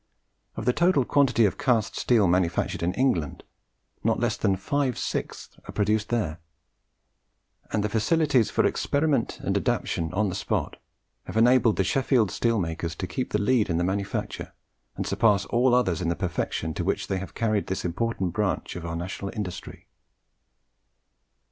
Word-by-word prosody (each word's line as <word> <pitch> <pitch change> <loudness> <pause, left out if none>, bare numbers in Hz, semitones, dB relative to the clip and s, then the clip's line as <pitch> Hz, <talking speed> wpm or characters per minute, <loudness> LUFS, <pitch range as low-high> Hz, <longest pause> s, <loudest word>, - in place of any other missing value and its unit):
Of - - -5
the 125 - +3
total 170 -5 +3
quantity 130 -5 +3
of 100 - -1
cast 115 -6 +1
steel 110 -6 +3
manufactured 85 -2 0
in 85 +2 -1
England, 95 - 0 0.6
not - - +1
less - - 0
than 95 - +1
five 130 +6 -1
sixths - - -4
are - - -3
produced 105 +1 0
there; 90 -9 -1 1.3
and 105 - 0
the - - +1
facilities 125 +3 +2
for - - +1
experiment 140 -4 0
and - - -1
adaptation 80 -1 -1
on 105 +2 +1
the - - -4
spot - - -2 0.5
have - - -5
enabled 120 -1 +5
the 95 - +1
Sheffield 120 -1 +2
steel 115 -1 +1
makers 85 -2 -3
to 95 - -4
keep 95 +9 -3
the 105 - 0
lead 110 0 +2
in 85 - +1
the 85 - +1
manufacture, 95 +2 -3 0.4
and - - -3
surpass 105 -4 +2
all 120 +1 +3
others 95 -10 +1
in 85 - 0
the 85 - 0
perfection 80 -3 -2
to - - -3
which - - -1
they 95 - -2
have 95 - -8
carried 110 -3 0
this 95 0 -3
important 95 0 -1
branch 105 -5 -1
of 85 -1 -5
our 85 - -4
national 95 +3 -4
industry. 100 -3 -6
105 Hz, 165 wpm, -26 LUFS, 90-120 Hz, 1.3 s, enabled